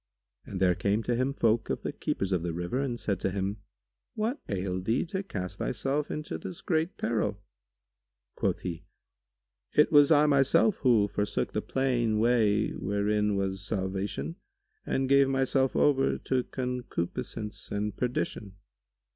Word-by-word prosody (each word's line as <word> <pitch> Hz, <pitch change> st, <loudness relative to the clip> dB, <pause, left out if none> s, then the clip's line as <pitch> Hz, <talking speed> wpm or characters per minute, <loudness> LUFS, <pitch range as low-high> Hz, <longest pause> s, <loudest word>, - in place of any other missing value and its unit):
And 95 Hz, -, -5 dB
there 90 Hz, -1 st, +4 dB
came 100 Hz, +5 st, 0 dB
to 120 Hz, -, 0 dB
him 130 Hz, +3 st, +1 dB
folk 115 Hz, -4 st, +1 dB
of -, -, -2 dB
the -, -, -3 dB
keepers 95 Hz, 0 st, -2 dB
of 90 Hz, -3 st, +1 dB
the 85 Hz, -1 st, -3 dB
river 90 Hz, +9 st, -2 dB
and 125 Hz, -4 st, -2 dB
said 100 Hz, -3 st, -1 dB
to -, -, 0 dB
him, 100 Hz, +2 st, -2 dB, 0.6 s
"What 225 Hz, +6 st, -1 dB
ailed 95 Hz, -1 st, -2 dB
thee 115 Hz, -, +1 dB
to 190 Hz, +3 st, -3 dB
cast 95 Hz, -, -6 dB
thyself 135 Hz, +5 st, -1 dB
into 150 Hz, -, -4 dB
this 90 Hz, +2 st, -7 dB
great 160 Hz, +1 st, 0 dB
peril?" 105 Hz, -3 st, -1 dB, 0.9 s
Quoth -, -, -1 dB
he, 85 Hz, -1 st, -5 dB, 0.9 s
"It 150 Hz, -, +5 dB
was 145 Hz, -2 st, +7 dB
I 150 Hz, -2 st, +6 dB
myself 145 Hz, -, +4 dB
who 115 Hz, -6 st, +4 dB
forsook 105 Hz, 0 st, -2 dB
the 105 Hz, -, 0 dB
plain 120 Hz, -5 st, 0 dB
way 110 Hz, -2 st, +3 dB
wherein 105 Hz, +1 st, 0 dB
was 95 Hz, -1 st, -2 dB
salvation 100 Hz, -, -3 dB, 0.5 s
and 135 Hz, 0 st, 0 dB
gave 140 Hz, 0 st, +5 dB
myself 135 Hz, 0 st, +1 dB
over 135 Hz, -2 st, +3 dB
to 130 Hz, -2 st, -1 dB
concupiscence 125 Hz, -4 st, -4 dB
and 105 Hz, 0 st, -2 dB
perdition." 110 Hz, -5 st, -2 dB
110 Hz, 150 wpm, -29 LUFS, 100-135 Hz, 0.9 s, was